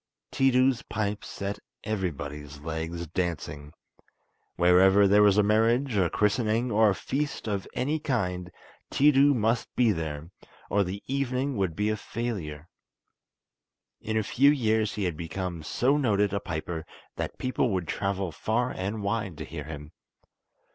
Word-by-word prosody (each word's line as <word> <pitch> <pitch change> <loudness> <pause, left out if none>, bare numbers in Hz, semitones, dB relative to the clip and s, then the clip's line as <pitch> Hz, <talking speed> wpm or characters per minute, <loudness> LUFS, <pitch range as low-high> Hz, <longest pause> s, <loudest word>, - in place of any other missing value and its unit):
Tiidu's 130 -1 +3
pipes 105 -1 -3
set 100 +1 -4 0.2
everybody's 75 -8 -4
legs 80 +2 -4
dancing. 75 -4 -3 0.8
Wherever 95 +3 +5
there 105 +2 +5
was 105 -1 +5
a 105 - +5
marriage, 115 +4 +2
a 95 -4 +3
christening, 110 +4 +1
or 110 0 +5
a 100 - +1
feast 140 +1 -3
of 100 -2 -2
any 145 +5 0
kind, 90 - -2 0.4
Tiidu 140 0 +5
must 115 +1 +1
be 120 -3 +4
there, 80 -2 -4 0.4
or 100 0 +3
the 95 +2 -5
evening 135 0 -1
would 95 -6 -1
be 105 +1 0
a 110 - +1
failure. 95 -10 -5 1.3
In 110 0 -2
a 110 - +2
few 140 +7 +4
years 110 -6 +1
he 105 - -2
had 90 -4 -1
become 85 0 -4
so 125 - +1
noted 105 -7 +2
a 100 - +1
piper 80 -2 -4 0.3
that - - -4
people 130 0 0
would 90 -5 -1
travel 95 -1 -2
far 120 +9 -1
and 100 +3 -3
wide 100 -5 -2
to - - -6
hear 75 -3 -7
him. 75 -1 -8
100 Hz, 145 wpm, -27 LUFS, 85-120 Hz, 1.3 s, Wherever